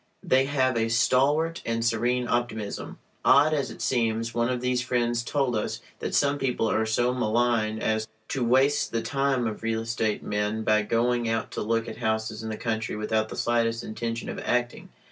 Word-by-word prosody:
They 130 Hz, +1 st, +3 dB
have 130 Hz, -3 st, +1 dB
a 115 Hz, 0 st, +1 dB
stalwart 140 Hz, +8 st, +2 dB
and 115 Hz, 0 st, -1 dB
serene 120 Hz, +2 st, +1 dB
optimism. 110 Hz, -4 st, -2 dB, 0.3 s
Odd 145 Hz, +3 st, +5 dB
as 140 Hz, -3 st, 0 dB
it -, -, -7 dB
seems, 115 Hz, -2 st, 0 dB
one 120 Hz, 0 st, +1 dB
of 125 Hz, -1 st, -1 dB
these 125 Hz, 0 st, 0 dB
friends 120 Hz, -2 st, 0 dB
told 130 Hz, 0 st, 0 dB
us 105 Hz, -, -2 dB, 0.2 s
that -, -, -3 dB
some 145 Hz, 0 st, +2 dB
people 125 Hz, -4 st, 0 dB
are 110 Hz, 0 st, +1 dB
so 120 Hz, +3 st, +1 dB
malign 115 Hz, -2 st, +1 dB
as 110 Hz, 0 st, -1 dB, 0.2 s
to 130 Hz, -, -1 dB
waste 130 Hz, +4 st, +3 dB
the 115 Hz, -, 0 dB
time 135 Hz, -3 st, 0 dB
of 110 Hz, -2 st, -4 dB
real 115 Hz, 0 st, -1 dB
estate 115 Hz, -2 st, -1 dB
men 105 Hz, +1 st, -1 dB
by 110 Hz, 0 st, +3 dB
going 120 Hz, +2 st, +1 dB
out 115 Hz, 0 st, -1 dB
to -, -, -4 dB
look 115 Hz, +1 st, 0 dB
at 110 Hz, -, -7 dB
houses 110 Hz, -1 st, -2 dB
in 110 Hz, -, -5 dB
the 110 Hz, -, -4 dB
country 110 Hz, -2 st, -2 dB
without 110 Hz, +1 st, -1 dB
the -, -, -7 dB
slightest 115 Hz, 0 st, +1 dB
intention 115 Hz, +1 st, -4 dB
of -, -, -5 dB
"acting." 120 Hz, 0 st, -1 dB
115 Hz, 190 wpm, -26 LUFS, 110-125 Hz, 0.3 s, Odd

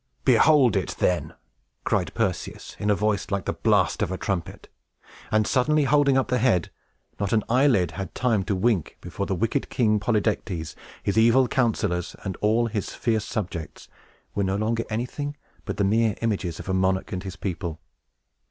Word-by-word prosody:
"Behold 130 Hz, -1 st, +5 dB
it, 95 Hz, -, -1 dB
then!" 90 Hz, -1 st, 0 dB, 0.5 s
cried -, -, 0 dB
Perseus, -, -, -3 dB
in 105 Hz, -, -1 dB
a 105 Hz, -, +4 dB
voice 105 Hz, -1 st, 0 dB
like 100 Hz, -2 st, -2 dB
the -, -, -1 dB
blast -, -, +2 dB
of -, -, 0 dB
a 95 Hz, -, -2 dB
trumpet. 95 Hz, -3 st, -4 dB, 0.6 s
And, 110 Hz, 0 st, +2 dB
suddenly 150 Hz, +6 st, +2 dB
holding 140 Hz, -1 st, +3 dB
up 130 Hz, -, +1 dB
the 125 Hz, 0 st, +1 dB
head, 115 Hz, -8 st, +2 dB, 0.5 s
not 100 Hz, 0 st, -1 dB
an 110 Hz, -2 st, +3 dB
eyelid 120 Hz, -, +3 dB
had 95 Hz, +3 st, -6 dB
time 115 Hz, -5 st, +1 dB
to 100 Hz, -, 0 dB
wink 95 Hz, -3 st, 0 dB
before 100 Hz, +3 st, -5 dB
the 95 Hz, -, 0 dB
wicked 115 Hz, +9 st, -1 dB
King 110 Hz, -4 st, +2 dB
Polydectes, 105 Hz, -7 st, -1 dB, 0.3 s
his 100 Hz, -, -1 dB
evil 120 Hz, +3 st, +5 dB
counselors, 105 Hz, -8 st, 0 dB
and 95 Hz, -1 st, -3 dB
all 110 Hz, +3 st, +3 dB
his 105 Hz, -4 st, -3 dB
fierce 110 Hz, -3 st, 0 dB
subjects 85 Hz, -8 st, -5 dB, 0.4 s
were 100 Hz, -, 0 dB
no 95 Hz, 0 st, 0 dB
longer 115 Hz, +3 st, -1 dB
anything 135 Hz, +6 st, -3 dB, 0.3 s
but -, -, -4 dB
the 100 Hz, -, +1 dB
mere 110 Hz, +2 st, +2 dB
images 95 Hz, -7 st, -1 dB
of -, -, -8 dB
a 95 Hz, -, -1 dB
monarch 95 Hz, 0 st, +1 dB
and 90 Hz, -, -3 dB
his 95 Hz, -1 st, -7 dB
people. 85 Hz, -4 st, -4 dB
105 Hz, 175 wpm, -25 LUFS, 95-120 Hz, 0.6 s, Behold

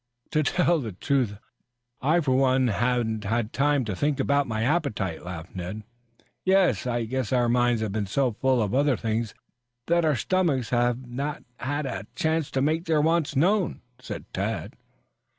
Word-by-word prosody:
"To 155 Hz, -, +2 dB
tell 170 Hz, +2 st, +2 dB
the 115 Hz, -7 st, -5 dB
truth, 120 Hz, 0 st, 0 dB, 0.6 s
I 160 Hz, +6 st, +3 dB
for 130 Hz, -4 st, +1 dB
one 130 Hz, -1 st, +3 dB
haven't 115 Hz, -1 st, 0 dB
had 110 Hz, +2 st, -1 dB
time 145 Hz, -2 st, +2 dB
to 105 Hz, -3 st, -3 dB
think 145 Hz, +6 st, 0 dB
about 140 Hz, 0 st, +2 dB
my 110 Hz, -1 st, -1 dB
appetite," 115 Hz, -, -1 dB
laughed 85 Hz, -2 st, -8 dB
Ned. 95 Hz, +4 st, -5 dB, 0.6 s
"Yes, 185 Hz, -, +3 dB
I 120 Hz, -1 st, 0 dB
guess 130 Hz, 0 st, -2 dB
our 125 Hz, -2 st, +3 dB
minds 120 Hz, -1 st, +2 dB
have 110 Hz, -, -2 dB
been 105 Hz, -1 st, -2 dB
so 130 Hz, +5 st, +1 dB
full 130 Hz, +1 st, +1 dB
of 100 Hz, -, -3 dB
other 140 Hz, -1 st, +3 dB
things 110 Hz, 0 st, -2 dB, 0.5 s
that 170 Hz, 0 st, +2 dB
our 155 Hz, -2 st, +3 dB
stomachs 145 Hz, -, 0 dB
have 120 Hz, +1 st, +1 dB
not 140 Hz, +4 st, -4 dB
had 145 Hz, +3 st, -2 dB
a 100 Hz, -5 st, -5 dB
chance 160 Hz, -1 st, 0 dB
to 130 Hz, -, 0 dB
make 160 Hz, +4 st, +1 dB
their 160 Hz, -2 st, +2 dB
wants 160 Hz, -1 st, +1 dB
known," 185 Hz, +6 st, +1 dB, 0.2 s
said -, -, -7 dB
Tad. -, -, -3 dB
130 Hz, 170 wpm, -26 LUFS, 110-150 Hz, 0.6 s, I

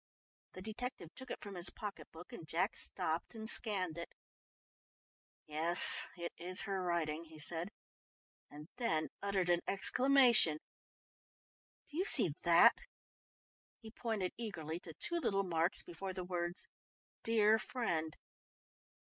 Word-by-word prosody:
The 185 Hz, -, -9 dB
detective 220 Hz, -5 st, -7 dB
took 260 Hz, -1 st, -12 dB
it -, -, -5 dB
from 200 Hz, -, -8 dB
his 175 Hz, -1 st, -1 dB
pocket 210 Hz, -2 st, -8 dB
book 165 Hz, +2 st, -13 dB
and 160 Hz, -, -10 dB
Jack 165 Hz, -, -1 dB
stopped 160 Hz, +8 st, -3 dB
and 220 Hz, -1 st, -7 dB
scanned 190 Hz, -8 st, +1 dB
it. 170 Hz, -, -7 dB, 1.4 s
"Yes, 160 Hz, +3 st, +5 dB
it 170 Hz, 0 st, -6 dB
is 180 Hz, +2 st, 0 dB
her 195 Hz, -1 st, -3 dB
writing," 170 Hz, -2 st, -2 dB
he 160 Hz, -1 st, -14 dB
said 165 Hz, +4 st, -1 dB, 0.8 s
and 150 Hz, +1 st, -12 dB
then 160 Hz, -10 st, -1 dB
uttered 195 Hz, -2 st, -1 dB
an 175 Hz, 0 st, +2 dB
exclamation. 245 Hz, -, +5 dB, 1.3 s
"Do 300 Hz, -, -10 dB
you 365 Hz, -, +1 dB
see 225 Hz, -, +5 dB
that?" 170 Hz, 0 st, +5 dB, 1.0 s
He 220 Hz, -1 st, -13 dB
pointed 220 Hz, -6 st, -3 dB
eagerly 170 Hz, -8 st, -5 dB
to 160 Hz, -3 st, -11 dB
two 345 Hz, -, -3 dB
little 195 Hz, -10 st, 0 dB
marks 170 Hz, -1 st, -1 dB
before 185 Hz, +3 st, -7 dB
the 185 Hz, -1 st, -5 dB
words 175 Hz, 0 st, -3 dB, 0.5 s
"Dear 220 Hz, -1 st, +3 dB
friend." 165 Hz, -12 st, -3 dB
180 Hz, 130 wpm, -35 LUFS, 165-220 Hz, 1.4 s, Yes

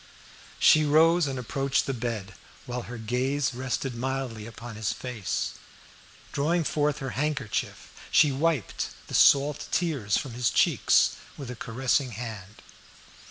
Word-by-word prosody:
She 155 Hz, -, +6 dB
rose 160 Hz, +2 st, +4 dB
and 135 Hz, -1 st, -3 dB
approached 135 Hz, +3 st, 0 dB
the 135 Hz, -, -2 dB
bed, 115 Hz, -5 st, -4 dB, 0.3 s
while 125 Hz, 0 st, -4 dB
her 120 Hz, -, -6 dB
gaze 130 Hz, +5 st, -1 dB
rested 130 Hz, +1 st, -3 dB
mildly 125 Hz, -3 st, -3 dB
upon 115 Hz, 0 st, -9 dB
his 105 Hz, -1 st, -1 dB
face. 125 Hz, -6 st, -3 dB, 0.8 s
Drawing 165 Hz, +4 st, +1 dB
forth 150 Hz, -1 st, 0 dB
her 135 Hz, -3 st, -4 dB
handkerchief, 135 Hz, -5 st, -3 dB, 0.2 s
she 150 Hz, -, +5 dB
wiped 145 Hz, -, -1 dB, 0.2 s
the -, -, -11 dB
salt 140 Hz, +1 st, +4 dB
tears 140 Hz, -, 0 dB
from 135 Hz, -5 st, -4 dB
his 120 Hz, 0 st, +1 dB
cheeks -, -, +3 dB, 0.2 s
with 135 Hz, -4 st, -6 dB
a -, -, -6 dB
caressing 125 Hz, +2 st, 0 dB
hand. 110 Hz, -3 st, -8 dB
130 Hz, 135 wpm, -27 LUFS, 115-145 Hz, 0.8 s, She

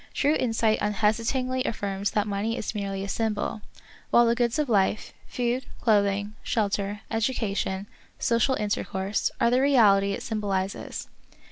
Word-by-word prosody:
True 290 Hz, +2 st, +3 dB
insight 225 Hz, -5 st, +1 dB
unhesitatingly 230 Hz, +5 st, 0 dB
affirms 200 Hz, -5 st, -2 dB
that 210 Hz, -1 st, 0 dB
mpney 210 Hz, +3 st, -2 dB
is -, -, -3 dB
merely 195 Hz, -2 st, -3 dB
a -, -, -4 dB
symbol, 215 Hz, 0 st, -2 dB, 0.5 s
while 240 Hz, -, +6 dB
the 230 Hz, -, +3 dB
goods 235 Hz, +2 st, 0 dB
of 300 Hz, -1 st, +1 dB
life 210 Hz, -2 st, +1 dB
— -, -, -25 dB
food, 245 Hz, +1 st, 0 dB
clothing, 205 Hz, -1 st, +2 dB
shel 210 Hz, -3 st, 0 dB
ter, 200 Hz, 0 st, -2 dB
education, 210 Hz, -4 st, -1 dB, 0.3 s
social 235 Hz, +3 st, +2 dB
intercourse 205 Hz, -2 st, -1 dB
— -, -, -32 dB
are 235 Hz, -, +3 dB
the 250 Hz, +1 st, +3 dB
reality 205 Hz, -8 st, +4 dB
it -, -, -5 dB
symbolizes. 200 Hz, -3 st, -3 dB
215 Hz, 150 wpm, -26 LUFS, 200-235 Hz, 0.5 s, while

